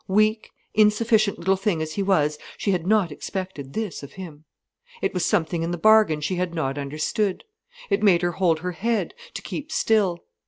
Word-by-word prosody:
Weak, 215 +3 +2 0.2
insufficient 215 0 +3
little 190 +3 +1
thing 195 -3 -1
as 155 0 -3
he 200 - -2
was, 150 -7 +1 0.2
she 200 - 0
had 180 -2 -1
not 205 -5 +3
expected 150 -5 -6
this 215 -2 -3
of 140 0 -11
him. 160 -5 -10 0.5
It - - -1
was 180 -2 -1
something 165 0 +1
in 165 - -1
the 175 - -2
bargain 215 -5 +5
she 180 +5 -2
had 180 -1 -2
not 145 -3 -2
understood. 155 +8 -2 0.5
It 400 - +2
made 185 -5 +4
her 175 - +1
hold 165 -3 +1
her 180 +1 -2
head, 225 +6 -1 0.2
to - - -4
keep - - -6
still. 205 -6 +2
185 Hz, 190 wpm, -24 LUFS, 160-210 Hz, 0.5 s, bargain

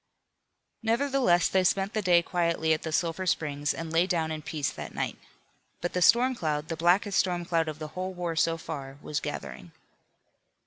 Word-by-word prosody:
Nevertheless 230 -6 +2
they 190 -1 +2
spent 195 +2 +1
the 215 - 0
day 175 -3 +4
quietly 170 -2 +1
at 155 - -1
the 160 - -4
Sulphur 170 +3 -1
Springs, 145 -3 0
and 165 -1 -5
lay 170 +3 +3
down 165 -4 0
in 155 -1 -4
peace 150 -2 -2
that - - -8
night. - - -2 0.6
But 175 - -3
the 180 - 0
storm 245 +8 +5
cloud, 155 -8 -2
the 165 - -2
blackest 180 +5 +3
storm 175 -2 0
cloud 165 -2 +1
of 155 -1 -4
the 155 -1 -6
whole 185 +3 -4
war 175 -2 -3
so 165 +1 +2
far, 140 -4 -7
was 150 -1 -2
gathering. - - -7
170 Hz, 185 wpm, -28 LUFS, 160-185 Hz, 0.6 s, storm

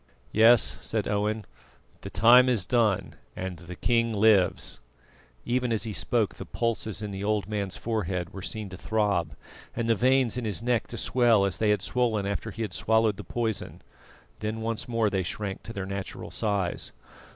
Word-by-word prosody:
"Yes," 115 +2 +5
said 110 -2 -2
Owen, 105 +1 -1 0.6
"the - - -7
time 120 +6 +6
is 110 -7 +2
done 105 -5 +1 0.2
and 95 -1 -5
the 90 +1 -9
king 115 +3 +1
lives!" 105 -8 +3 0.7
Even 125 0 0
as 110 -1 +1
he 110 -3 -1
spoke 80 - +1
the - - -8
pulses 115 -2 -2
in 105 - -4
the 95 0 -5
old 105 -1 0
man's 100 -3 -2
forehead 95 -6 -2
were 95 - -7
seen 105 +2 -5
to 95 - -9
throb, 100 -8 0 0.4
and 115 -1 -1
the 115 - +4
veins 125 +1 +2
in 125 - -3
his 110 +1 -1
neck 120 -1 +1
to - - -7
swell 120 -5 +3
as 100 - -2
they 110 - +2
had 105 - +2
swollen 115 -5 0
after 100 +3 -3
he 115 +2 -4
had 105 -5 -4
swallowed 110 -2 +2
the - - -7
poison; 115 -4 -3 0.6
then 110 +1 -3
once 115 0 -3
more 115 -3 +1
they 95 -1 +1
shrank 95 +2 -4
to - - -9
their 95 -4 -4
natural 100 0 -6
size. 100 -5 -1
110 Hz, 185 wpm, -27 LUFS, 100-115 Hz, 0.7 s, time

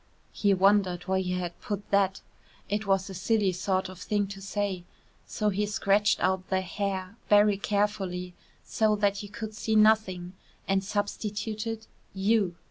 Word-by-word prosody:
He 205 - +1
wondered 190 -2 +3
why 190 0 0
he 180 -1 -2
had 180 -1 -4
put 205 -1 -5
that: 195 -1 +2 0.5
it 210 +1 -2
was 195 -1 +2
a 195 - -7
silly 195 +1 +1
sort 185 +1 -1
of 185 -1 -10
thing 205 -1 0
to 195 -1 -8
say; 200 -2 -2 0.4
so 210 -1 0
he 205 +1 0
scratched 205 0 +2
out 185 0 0
the 190 -1 +1
"hair" 190 +1 -3
very 205 0 +6
carefully 200 -3 -1 0.3
so 215 -1 +2
that 205 0 +1
you 205 - -8
could 215 +1 -6
see 220 +1 -1
nothing, 215 -5 +3 0.3
and 195 0 +1
substituted 210 +2 -3 0.3
"you." 195 -2 +2
200 Hz, 155 wpm, -28 LUFS, 190-210 Hz, 0.5 s, very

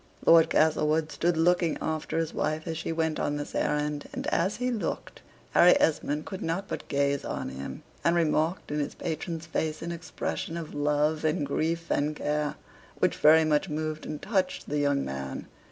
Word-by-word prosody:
Lord 165 -1 +7
Castlewood 155 0 +2
stood 170 +2 0
looking 170 0 +3
after 160 0 -2
his 165 -1 -1
wife 155 +1 -1
as 165 -2 -3
she 165 +1 -3
went 160 -1 0
on 145 - 0
this 145 - -6
errand, 150 0 -1
and - - -5
as 195 +4 +1
he 250 +3 -1
looked, 225 -4 -4 0.3
Harry 180 +1 +6
Esmond 150 -1 +1
could 190 - -6
not 175 +5 -2
but - - -5
gaze 140 0 +1
on - - -4
him, 65 +1 -7 0.2
and 170 - +3
remarked 160 0 +1
in 150 - -1
his 145 - -3
patron's 165 0 -4
face 160 -1 -2
an 170 - -3
expression 170 0 -4
of 165 -2 -6
love, 150 +2 +1
and 155 -2 +1
grief, 165 +4 -1
and 150 +1 +1
care, 150 0 -1 0.4
which - - +1
very 160 +1 +6
much 150 -1 +1
moved 155 0 -3
and 150 -1 -6
touched 190 -4 -1
the 150 +1 -1
young 145 -1 +1
man. 65 0 -5
155 Hz, 185 wpm, -28 LUFS, 150-165 Hz, 0.4 s, Lord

